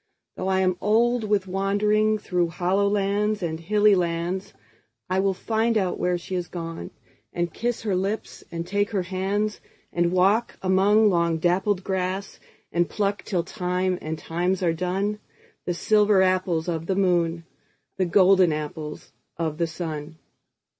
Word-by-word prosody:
Though -, -, -4 dB
I 190 Hz, 0 st, +2 dB
am 185 Hz, -1 st, +1 dB
old 235 Hz, +2 st, +2 dB
with 205 Hz, -2 st, +1 dB
wanderingThrough 200 Hz, -1 st, +1 dB
hollow 185 Hz, +3 st, +1 dB
lands 205 Hz, 0 st, 0 dB
and 160 Hz, -1 st, -2 dB
hilly 210 Hz, +4 st, +3 dB
lands,I 170 Hz, -, -3 dB
will 195 Hz, 0 st, +1 dB
find 225 Hz, +3 st, 0 dB
out 185 Hz, -4 st, -1 dB
where 180 Hz, 0 st, +1 dB
she 175 Hz, +2 st, -8 dB
has 180 Hz, -1 st, -2 dB
gone, 165 Hz, -1 st, -6 dB, 0.4 s
And 175 Hz, -1 st, -2 dB
kiss 240 Hz, 0 st, -2 dB
her 205 Hz, -4 st, 0 dB
lips 195 Hz, +4 st, -3 dB
and 170 Hz, 0 st, -4 dB
take 205 Hz, +3 st, 0 dB
her 195 Hz, -4 st, -1 dB
hands; 195 Hz, +3 st, -2 dB, 0.3 s
And 175 Hz, 0 st, +1 dB
walk 195 Hz, +6 st, +2 dB
among 200 Hz, +3 st, +4 dB
long 170 Hz, -2 st, +1 dB
dappled 180 Hz, +3 st, +1 dB
grass, 190 Hz, +1 st, -3 dB, 0.3 s
And 175 Hz, 0 st, +1 dB
pluck 205 Hz, -1 st, -1 dB
till 180 Hz, -5 st, -1 dB
time 180 Hz, -1 st, -1 dB
and 155 Hz, +1 st, -4 dB
times 180 Hz, +4 st, -1 dB
are 170 Hz, -2 st, +2 dB
done, 190 Hz, +5 st, -2 dB, 0.5 s
The 175 Hz, -, -1 dB
silver 210 Hz, 0 st, +4 dB
apples 185 Hz, -3 st, +1 dB
of 165 Hz, -1 st, -3 dB
the 190 Hz, -, 0 dB
moon, 175 Hz, -3 st, +1 dB, 0.5 s
The 190 Hz, -, +2 dB
golden 185 Hz, 0 st, +5 dB
apples 150 Hz, 0 st, -5 dB, 0.3 s
of 160 Hz, -2 st, -2 dB
the 170 Hz, -, +1 dB
sun. 160 Hz, -2 st, -6 dB
185 Hz, 150 wpm, -24 LUFS, 170-205 Hz, 0.5 s, golden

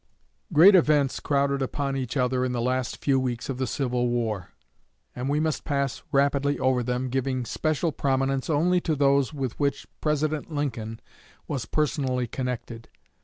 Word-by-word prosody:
Great 175 Hz, +6 st, +8 dB
events 150 Hz, -6 st, +3 dB
crowded 140 Hz, -1 st, +1 dB
upon 135 Hz, +1 st, -2 dB
each 130 Hz, 0 st, -3 dB
other 125 Hz, 0 st, +1 dB
in 125 Hz, -1 st, -1 dB
the 120 Hz, -, -1 dB
last 130 Hz, -1 st, -1 dB
few 135 Hz, -2 st, +2 dB
weeks 125 Hz, -1 st, -3 dB
of 130 Hz, -2 st, -3 dB
the 130 Hz, -, 0 dB
Civil 125 Hz, -1 st, 0 dB
War; 110 Hz, -6 st, -2 dB, 0.7 s
and 125 Hz, +2 st, -3 dB
we 145 Hz, +1 st, +1 dB
must 155 Hz, -1 st, -1 dB
pass 140 Hz, -3 st, -1 dB
rapidly 140 Hz, +1 st, +2 dB
over 130 Hz, -1 st, +2 dB
them, 125 Hz, +1 st, -1 dB
giving 130 Hz, 0 st, -1 dB
special 155 Hz, +5 st, -1 dB
prominence 135 Hz, 0 st, 0 dB
only 175 Hz, +4 st, +2 dB
to 160 Hz, -3 st, 0 dB
those 140 Hz, -1 st, +3 dB
with 135 Hz, -5 st, -4 dB
which 140 Hz, -1 st, 0 dB, 0.2 s
President 155 Hz, +1 st, -1 dB
Lincoln 115 Hz, -7 st, -3 dB, 0.5 s
was 130 Hz, -6 st, -3 dB
personally 135 Hz, -4 st, 0 dB
connected. 120 Hz, -2 st, -5 dB
135 Hz, 160 wpm, -26 LUFS, 125-145 Hz, 0.7 s, Great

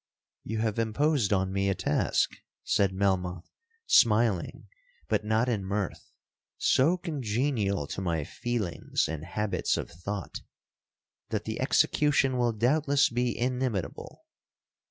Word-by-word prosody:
'—'You 110 Hz, -, -4 dB
have 110 Hz, 0 st, -1 dB
imposed 115 Hz, +1 st, +1 dB
on 95 Hz, -1 st, +1 dB
me 100 Hz, 0 st, +1 dB
a 95 Hz, -, +1 dB
task,' -, -, 0 dB, 0.3 s
said 100 Hz, -2 st, +2 dB
Melmoth 95 Hz, -2 st, -1 dB, 0.4 s
smiling, 110 Hz, -, +3 dB, 0.4 s
but -, -, 0 dB
not 110 Hz, +3 st, +1 dB
in 110 Hz, -5 st, 0 dB
mirth, 100 Hz, 0 st, -3 dB, 0.5 s
'so 160 Hz, +8 st, +3 dB
congenial 120 Hz, -, -1 dB
to 95 Hz, -, -5 dB
my 85 Hz, -4 st, -1 dB
feelings 115 Hz, +1 st, -2 dB
and 80 Hz, -1 st, -5 dB
habits 100 Hz, +3 st, -1 dB
of -, -, -5 dB
thought, 95 Hz, +3 st, -6 dB, 0.9 s
that -, -, -2 dB
the -, -, -4 dB
execution 140 Hz, -3 st, +2 dB
will 120 Hz, -1 st, +2 dB
doubtless 140 Hz, +6 st, +2 dB
be 120 Hz, 0 st, -1 dB
inimitable. 125 Hz, -6 st, -3 dB
110 Hz, 120 wpm, -28 LUFS, 95-125 Hz, 0.9 s, smiling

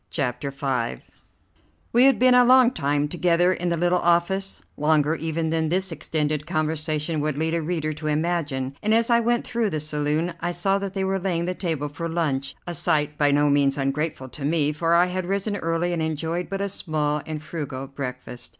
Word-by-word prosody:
CHAPTER 140 Hz, -2 st, -2 dB
V 130 Hz, -, -2 dB, 0.9 s
We 245 Hz, +3 st, +6 dB
had 270 Hz, -, +5 dB
been 255 Hz, 0 st, +5 dB
a 250 Hz, 0 st, +7 dB
long 255 Hz, 0 st, +6 dB
time 145 Hz, -, 0 dB
together 175 Hz, +2 st, +2 dB
in 175 Hz, -1 st, -2 dB
the 170 Hz, -, 0 dB
little 175 Hz, +2 st, +2 dB
office, 175 Hz, +3 st, +1 dB
longer 150 Hz, 0 st, +2 dB
even 160 Hz, +1 st, -2 dB
than 160 Hz, -1 st, 0 dB
this 190 Hz, +2 st, 0 dB
extended 150 Hz, -1 st, -2 dB
conversation 155 Hz, -1 st, -1 dB
would 150 Hz, -1 st, -1 dB
lead 160 Hz, +1 st, 0 dB
a 170 Hz, -, 0 dB
reader 155 Hz, -1 st, -2 dB
to 155 Hz, +1 st, -6 dB
imagine, 150 Hz, -4 st, -1 dB
and 215 Hz, +1 st, +2 dB
as 230 Hz, +1 st, +2 dB
I 235 Hz, -, +5 dB
went 235 Hz, +1 st, +1 dB
through 235 Hz, -3 st, 0 dB
the 155 Hz, -, -2 dB
saloon 150 Hz, +3 st, -1 dB
I 175 Hz, +1 st, -1 dB
saw 195 Hz, +3 st, +1 dB
that 200 Hz, -1 st, -5 dB
they 195 Hz, -, 0 dB
were 190 Hz, 0 st, 0 dB
laying 175 Hz, -3 st, -1 dB
the 180 Hz, -, -1 dB
table 160 Hz, -6 st, -2 dB
for 155 Hz, +4 st, -5 dB
lunch, 140 Hz, -5 st, -1 dB
a 175 Hz, -, -4 dB
sight 150 Hz, -1 st, 0 dB
by 145 Hz, -1 st, +4 dB
no 145 Hz, +1 st, +3 dB
means 140 Hz, 0 st, +2 dB
ungrateful 135 Hz, 0 st, -2 dB
to 135 Hz, +3 st, -9 dB
me, 150 Hz, 0 st, +2 dB
for 165 Hz, +2 st, +1 dB
I 175 Hz, +1 st, +5 dB
had 180 Hz, 0 st, -3 dB
risen 200 Hz, +2 st, -1 dB
early 165 Hz, 0 st, -1 dB
and 170 Hz, -, -1 dB
enjoyed 160 Hz, +3 st, -2 dB
but 195 Hz, 0 st, -3 dB
a 200 Hz, -, -1 dB
small 150 Hz, -5 st, -1 dB
and 155 Hz, -1 st, -4 dB
frugal 150 Hz, -4 st, -5 dB
breakfast. 125 Hz, -3 st, -7 dB
160 Hz, 205 wpm, -24 LUFS, 150-180 Hz, 0.9 s, a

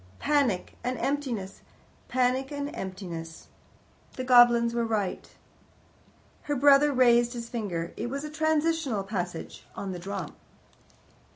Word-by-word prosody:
Panic 280 Hz, -11 st, 0 dB
and 250 Hz, 0 st, -2 dB
emptiness! 250 Hz, -9 st, -3 dB, 0.5 s
Panic 255 Hz, +2 st, 0 dB
and 285 Hz, 0 st, -4 dB
emptiness! 175 Hz, -4 st, -7 dB, 0.6 s
The 255 Hz, -, -5 dB
goblins 240 Hz, -2 st, +6 dB
were 235 Hz, 0 st, 0 dB
right. 215 Hz, -4 st, -2 dB, 1.1 s
Her 290 Hz, -, -2 dB
brother 285 Hz, +2 st, +5 dB
raised 240 Hz, -2 st, +4 dB
his 235 Hz, -1 st, -6 dB
finger: 180 Hz, -8 st, -4 dB
it 235 Hz, -, -4 dB
was 275 Hz, +2 st, -4 dB
the 300 Hz, -, -6 dB
transitional 315 Hz, -7 st, 0 dB
passage 180 Hz, -4 st, -5 dB
on 195 Hz, -, -5 dB
the 180 Hz, -, -6 dB
drum. 190 Hz, -2 st, -6 dB
240 Hz, 120 wpm, -27 LUFS, 195-275 Hz, 1.1 s, goblins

